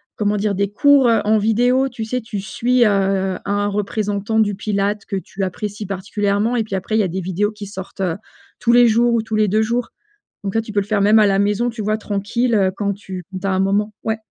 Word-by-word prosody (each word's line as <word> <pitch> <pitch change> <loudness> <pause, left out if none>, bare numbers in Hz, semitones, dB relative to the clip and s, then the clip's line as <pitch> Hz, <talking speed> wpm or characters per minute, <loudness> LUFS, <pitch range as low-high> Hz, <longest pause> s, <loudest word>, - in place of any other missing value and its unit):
comment 210 0 0
dire, 205 0 0
des 200 +1 -1
cours, 280 +3 +5
heu, 230 - +3
en 215 +1 +3
vidéo. 245 +5 +2
Tu 230 -3 -6
sais, 250 +3 -2
tu 225 -3 -5
suis, 240 +5 +1
heu, 195 -2 +1
un 205 0 0
représentant 205 +1 -1
du 205 -2 +2
Pilates 200 0 -2
que 200 - -4
tu 195 +1 -5
apprécies 205 +2 -4
particulièrement 200 +4 -1
et 230 - +1
puis, 210 -2 -5
après, 190 +3 -2
il - - +3
y - - +3
a - - 0
des 185 +2 -4
vidéos 190 +4 -1
qui 210 -1 -9
sortent, 195 -1 -8
heu, 180 -4 0 0.4
tous 235 - +2
les 240 0 +7
jours 235 +2 +3
ou 230 -1 +1
tous 220 0 -4
les 215 0 +3
2 215 +3 +2
jours. 235 +2 -1 0.5
Donc 195 -1 -3
là, 225 - +3
tu 220 - -9
peux 205 - +1
le - - -5
faire 205 -1 0
même 210 +2 +5
à 215 - +5
la 195 -1 +2
maison, 210 +4 +1
tu 225 -1 -6
vois, 215 +1 0
tranquille, 220 +4 -1
heu, 190 -3 +3
quand 200 -1 -1
tu 190 -2 -8 0.2
tu 195 - -2
as - - +1
un 190 - 0
moment. 200 +2 +1
Ouais. 220 0 -1
210 Hz, 250 wpm, -19 LUFS, 195-220 Hz, 0.5 s, les